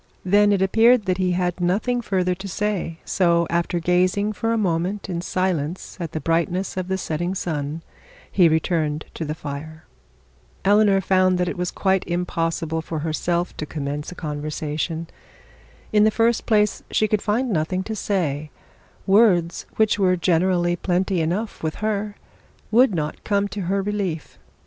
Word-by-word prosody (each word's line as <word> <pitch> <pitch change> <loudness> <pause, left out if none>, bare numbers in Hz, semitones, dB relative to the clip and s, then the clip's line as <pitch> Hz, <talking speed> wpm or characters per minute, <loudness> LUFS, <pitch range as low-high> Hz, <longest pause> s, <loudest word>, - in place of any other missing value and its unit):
Then 205 +2 +4
it 195 -2 +2
appeared 225 +3 +4
that 185 -1 0
he 180 -1 +1
had 180 0 -1
nothing 215 +8 +1
further 185 -4 0
to 190 +2 -7
say; 195 -4 -2
so 170 -3 +2
after 170 +1 0
gazing 185 +5 +1
for 225 +3 -1
a 230 - +1
moment 190 0 -1
in 170 -1 -2
silence 180 -2 -2
at 170 -3 -4
the 160 - -3
brightness 170 +5 0
of 185 -1 -3
the 190 0 -1
setting 175 +1 -2
sun, 155 -2 -3 0.5
he 175 -4 +5
returned 160 -1 0
to - - -4
the 150 0 -3
fire. 155 +1 -7 0.8
Eleanor 205 -1 +4
found 185 -1 +3
that 180 0 0
it - - -2
was 180 0 -2
quite 190 -1 +1
impossible 165 -2 -1
for 160 0 -5
herself 170 +3 -1
to 155 - -3
commence 145 0 -4
a - - -9
conversation. 155 +1 -3 0.9
In 210 -1 +5
the 215 - +6
first 230 +1 +1
place 210 -2 +2
she 215 - +2
could 210 -1 0
find 235 +4 0
nothing 185 +2 0
to 220 +3 -4
say; 155 -8 -1 0.6
words, 190 -5 +3
which 215 -1 +2
were 185 -2 +3
generally 175 0 +2
plenty 180 0 0
enough 185 +8 -2
with 155 -1 -2
her, 210 -1 -2 0.6
would 235 -2 +5
not 150 -2 -3
come 200 -1 +1
to 200 +1 -5
her 195 0 +1
relief. 195 -6 -3
180 Hz, 165 wpm, -22 LUFS, 165-200 Hz, 0.9 s, the